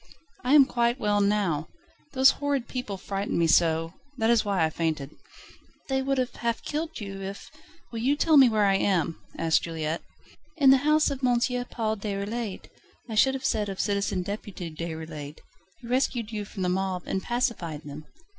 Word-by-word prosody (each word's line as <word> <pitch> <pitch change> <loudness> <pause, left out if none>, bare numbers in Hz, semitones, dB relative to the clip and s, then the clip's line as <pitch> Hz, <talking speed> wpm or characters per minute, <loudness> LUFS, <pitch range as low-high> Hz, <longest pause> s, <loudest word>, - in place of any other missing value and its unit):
"I 255 +4 +4
am 280 -2 +8
quite 240 0 0
well 205 -1 +2
now. 200 -7 +1 0.5
Those 265 0 +6
horrid 280 -4 -2
people 250 -6 -4
frightened 195 +1 -3
me 170 - +3
so, 165 0 +3 0.2
that 225 -1 +2
is 235 -2 +4
why 195 -5 +1
I 160 - -2
fainted." 155 -4 -2 0.8
"They 265 0 +1
would 275 0 0
have 255 -1 -1
half 235 -1 -2
killed 315 +2 -4
you, 195 -2 -6
if 195 +1 -7 0.2
..." - - -28
"Will 230 - -4
you 265 +5 +2
tell 315 +1 +3
me 270 -4 +8
where 215 -2 +2
I 195 -1 +4
am?" 175 -5 0 0.2
asked 160 -1 +2
Juliette. 160 -1 -3 0.6
"In 275 -4 +6
the 270 - +7
house 300 +2 +3
of 275 -1 -5
M. 245 -1 +3 0.3
Paul 220 -2 -2
Déroulède 205 +1 -4 0.4
I 225 - -6
should 265 +5 +4
have 265 - -5
said 210 -2 0
of 195 - -6
Citizen 200 -3 0
Deputy 190 -4 -6
Déroulède. 160 -2 -6 0.4
He - - -12
rescued 245 -3 0
you 210 -2 -4
from 195 -2 -6
the 180 - +1
mob, 185 -1 -1
and 190 - -2
pacified 205 - -2
them. 150 +1 -9
205 Hz, 185 wpm, -27 LUFS, 175-250 Hz, 0.8 s, am